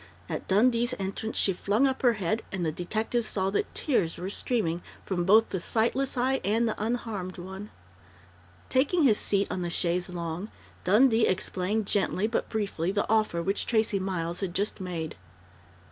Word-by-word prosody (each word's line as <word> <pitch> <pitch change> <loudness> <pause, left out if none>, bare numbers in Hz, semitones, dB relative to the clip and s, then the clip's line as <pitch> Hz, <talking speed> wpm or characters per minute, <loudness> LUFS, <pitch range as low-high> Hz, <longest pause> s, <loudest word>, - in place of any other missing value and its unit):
At - - -5
Dundee's 235 +4 +3
entrance 195 +3 -3
she 195 - +3
flung 205 +8 +1
up 265 -1 0
her 245 -2 +5
head, 210 +1 -1
and 185 -3 -2
the 160 - +1
detective 220 +8 -1
saw 195 -3 -1
that 200 - -1
tears 195 - 0
were 185 +2 -4
streaming 195 -8 -1 0.2
from 175 -3 -1
both 215 +4 +5
the 190 - -2
sightless 240 +8 0
eye 260 +2 +1
and 225 +4 +2
the 215 -1 -2
unharmed 215 -5 -3
one. 190 +3 -8 1.0
Taking 295 +6 +2
his 225 -7 +4
seat 200 0 +1
on 185 - -2
the 175 - -2
chaise 175 +1 +1
longue, 170 +3 -4 0.4
Dundee 225 +3 +5
explained 190 +3 0
gently 200 0 +1
but 225 +1 -1
briefly 200 -5 -1
the 205 +1 0
offer 215 -6 +1
which 195 +3 0
Tracey 220 -3 +2
Miles 180 -3 -2
had 185 -3 -3
just 200 +1 -1
made. 170 -4 -4
200 Hz, 170 wpm, -28 LUFS, 180-225 Hz, 1.0 s, her